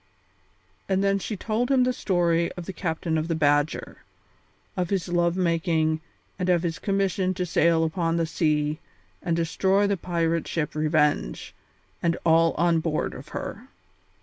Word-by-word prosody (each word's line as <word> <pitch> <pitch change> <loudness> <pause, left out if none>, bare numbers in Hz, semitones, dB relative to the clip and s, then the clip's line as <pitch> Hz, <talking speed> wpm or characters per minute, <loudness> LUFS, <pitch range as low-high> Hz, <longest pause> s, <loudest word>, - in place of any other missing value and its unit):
And 190 0 +2
then 195 0 +2
she 210 +2 -4
told 225 +5 -1
him 265 -2 +4
the 250 0 +1
story 170 -6 +1
of 175 - -8
the 190 - -6
captain 160 -2 -1
of 155 - -3
the 165 - 0
Badger; 145 0 +1 0.8
of 180 -2 -1
his 195 -3 -1
love 175 0 +1
making 165 -3 +1 0.4
and 180 0 -1
of 175 -1 +3
his 165 -2 -2
commission 195 -2 0
to 180 0 -1
sail 165 -1 +3
upon 165 0 0
the 165 - +1
sea 155 -2 0 0.4
and 170 - 0
destroy 190 +5 +2
the 200 -1 +1
pirate 170 -1 -1
ship 155 -3 -2
Revenge, 150 - 0 0.5
and 170 0 +1
all 165 0 +4
on 170 -1 +2
board 160 -1 -1
of 140 - -10
her. 225 +9 -6
170 Hz, 160 wpm, -25 LUFS, 160-185 Hz, 0.8 s, him